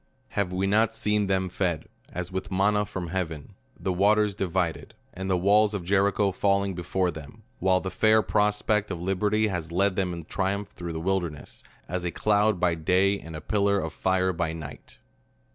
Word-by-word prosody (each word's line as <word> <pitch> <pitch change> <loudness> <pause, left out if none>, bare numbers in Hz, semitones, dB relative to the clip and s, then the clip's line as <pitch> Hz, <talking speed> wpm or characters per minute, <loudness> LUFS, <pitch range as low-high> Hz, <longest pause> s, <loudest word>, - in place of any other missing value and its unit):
Have 100 -3 -1
we 95 +1 0
not 110 +3 +2
seen 105 -2 +1
them 95 -1 +1
fed, 85 -3 -2 0.3
as 90 0 -5
with 95 -1 -4
manna 105 +2 +2
from 95 -4 -5
hea 95 +2 0
ven; 80 -4 -9 0.3
the 95 - -1
waters 105 +2 +3
divided, 90 -3 -2 0.2
and 95 +1 -5
the 95 - +2
walls 105 +3 +3
of 95 - -3
Jericho 100 +2 +2
fall 100 +1 +2
ing 100 -1 -2
before 90 +1 -1
them, 80 +8 -11 0.2
while 95 0 +3
the 95 - -4
fair 110 0 +4
prospect 105 0 +1
of 90 -3 -4
liberty 105 +4 +1
has 85 -4 -4
led 95 +2 +2
them 95 -2 0
in 85 -2 -6
triumph 100 +3 -2
through 85 -1 -7
the 80 - -3
wilderness, 85 -4 -3 0.2
as 90 +1 -3
a 90 - -1
cloud 105 +1 +2
by 90 -1 +2
day, 95 +5 +2
and 80 0 -9
a 80 - -6
pillar 100 +1 +1
of 80 -3 -4
fire 95 0 +1
by 85 -1 -2
night 80 -3 -9
95 Hz, 195 wpm, -26 LUFS, 90-100 Hz, 0.3 s, fair